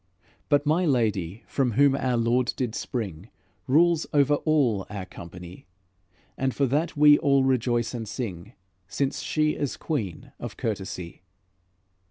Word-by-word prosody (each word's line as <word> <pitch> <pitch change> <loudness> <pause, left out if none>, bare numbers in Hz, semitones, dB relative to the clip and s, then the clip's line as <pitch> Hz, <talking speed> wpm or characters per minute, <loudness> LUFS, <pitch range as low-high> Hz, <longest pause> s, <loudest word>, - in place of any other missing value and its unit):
But 145 -1 +3
my 160 +5 +2
Lady, 110 - 0
from 130 -4 0
whom 140 +3 +4
our 130 -3 0
Lord 120 +2 +1
did 125 -4 -2
spring, 100 -7 -5 0.4
Rules 165 +4 +3
over 145 0 +3
all 140 -10 +1
our 100 -3 -5
company, 90 +1 -11 0.7
And 130 -1 0
for 140 - +2
that 150 +5 -1
we 150 0 +7
all 140 -1 +3
rejoice 120 -2 +1
and 115 -2 -5
sing, 100 -3 -6 0.3
Since 135 +7 -2
she 155 0 +1
is 145 -3 -3
Queen 105 - -4
of - - -7
courtesy." 95 -6 -5
125 Hz, 140 wpm, -26 LUFS, 105-145 Hz, 0.7 s, we